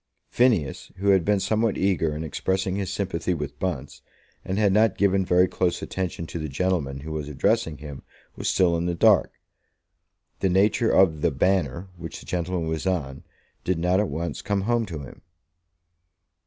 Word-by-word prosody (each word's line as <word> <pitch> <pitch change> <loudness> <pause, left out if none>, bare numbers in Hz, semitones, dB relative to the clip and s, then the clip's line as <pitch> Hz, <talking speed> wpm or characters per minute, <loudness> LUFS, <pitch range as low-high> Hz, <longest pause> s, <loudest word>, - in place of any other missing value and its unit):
Phineas, 110 - +1
who 100 +2 0
had 95 -3 +5
been 105 +1 +2
somewhat 110 +2 +1
eager 85 -5 +1
in 80 - -4
expressing 95 +5 -1
his 100 -2 -3
sympathy 90 -2 -2
with 75 -2 -6
Bunce, 75 -7 -4 0.4
and 95 +1 -3
had 105 -2 +3
not 110 -1 +3
given 100 -1 +3
very 90 0 +4
close 90 -1 -1
attention 90 -3 -3
to 85 - -6
the 75 -1 -4
gentleman 70 -3 -1
who 80 +2 -7
was 75 -1 -4
addressing 80 +3 0
him, 70 -2 -9 0.3
was - - -2
still 90 -2 +3
in 85 +1 -1
the 85 - -1
dark. - - +4 1.1
The 95 - +1
nature 100 +5 +3
of 80 -6 +4
the 85 - +3
Banner, 90 +4 0
which 85 -2 -7
the - - -14
gentleman 85 -1 -2
was 80 +3 -2
on, 75 -8 -2 0.4
did 90 -2 0
not 90 +3 +2
at 105 - 0
once 85 +4 -4
come 100 -2 -1
home 115 +2 0
to 80 -5 -6
him. 65 - -12
90 Hz, 180 wpm, -25 LUFS, 80-95 Hz, 1.1 s, had